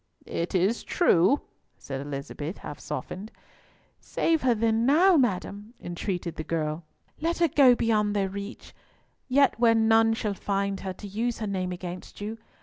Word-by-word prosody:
"It 170 +3 -3
is 190 +6 +1
true," 265 - +3 0.4
said 135 -1 -6
Elizabeth, 145 +4 -5
half 145 - -8
softened. 190 - -6 0.7
"Save 325 -2 0
her 250 -2 +3
then 225 +1 +1
now, 340 +9 +5
madam," 210 - -1
entreated 175 -1 -4
the 155 - -3
girl. 155 0 -2 0.4
"Let 335 +2 -1
her 335 - +4
go 270 -4 +6
beyond 210 -3 +1
their 195 -1 +1
reach, 200 +4 -8 0.5
yet 270 -1 +3
where 230 -1 +5
none 225 0 +4
shall 210 -2 -2
find 200 0 -2
her 190 -1 -4
to 205 - -10
use 225 +4 -2
her 220 - -4
name 185 -3 -2
against 180 0 -7
you. 215 +2 -5
205 Hz, 155 wpm, -27 LUFS, 180-235 Hz, 0.7 s, go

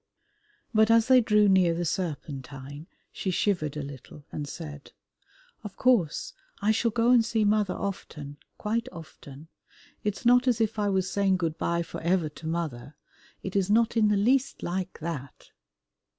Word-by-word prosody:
But 220 0 +4
as 230 +2 +4
they 255 -1 +7
drew 210 -2 +4
near 185 -3 +4
the 175 +1 -2
Serpentine, 145 -4 -5 0.2
she 190 - -4
shivered 175 -5 0
a 150 - -3
little, 140 +1 -11
and 145 - -5
said, 145 -2 -9 0.7
"Of 210 -3 -8
course 250 - +1 0.3
I 210 - +2
shall 225 +2 +1
go 230 +2 +2
and 240 -2 +6
see 225 -1 0
mother 205 -2 +2
often, 150 -7 -6 0.2
quite 230 +4 -2
often. 155 -3 -12 0.6
It 210 -1 -1
is - - -13
not 245 +2 +5
as 240 -2 +2
if 220 -1 0
I 205 -1 +1
was 190 -1 +1
saying 195 -1 +1
good 165 -3 -2
bye 170 0 0
for - - -8
ever 170 -1 +1
to 155 +2 -10
mother, 155 -5 -4 0.5
it 190 - -5
is 195 -1 +1
not 230 +2 +3
in 220 -2 +4
the 210 -1 +2
least 260 +6 +1
like 185 +1 -3
that." 145 -5 -6
190 Hz, 170 wpm, -27 LUFS, 155-220 Hz, 0.7 s, they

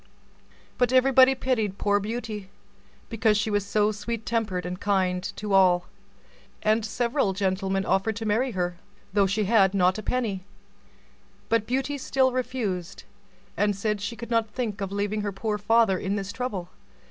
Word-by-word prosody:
But 245 -1 +3
everybody 260 0 +6
pitied 225 -7 -1
poor 205 0 +2
Beauty, 215 -2 -5 0.6
because 220 -2 +2
she 210 +1 -1
was 205 -1 +1
so 210 +1 +1
sweet 220 +2 -5
tempered 215 -6 -1
and 180 +1 -5
kind 190 -3 +1
to 210 -1 -4
all, 180 -2 +5 0.8
and 215 +1 +2
several 235 -1 0
gentlemen 195 0 -1
offered 210 +3 +1
to 225 +2 -5
marry 225 +5 +1
her, 180 -2 -2 0.4
though 200 -1 +4
she 210 +3 0
had 200 -2 +3
not 185 +1 +3
a - - -4
penny; 215 -5 -2 1.1
but 225 -2 +1
Beauty 270 +3 -1
still 260 0 +2
refused, 240 -9 -3 0.5
and 205 0 +1
said 210 +1 -2
she 235 +3 -4
could 235 +1 -9
not 230 -1 +2
think 215 -4 -4
of 195 -1 -3
leaving 205 +1 -1
her 205 -1 -2
poor 210 +2 -3
father 205 -2 +3
in 195 +1 -2
this 200 -1 -3
trouble. 205 -7 -4
210 Hz, 160 wpm, -26 LUFS, 195-230 Hz, 1.1 s, everybody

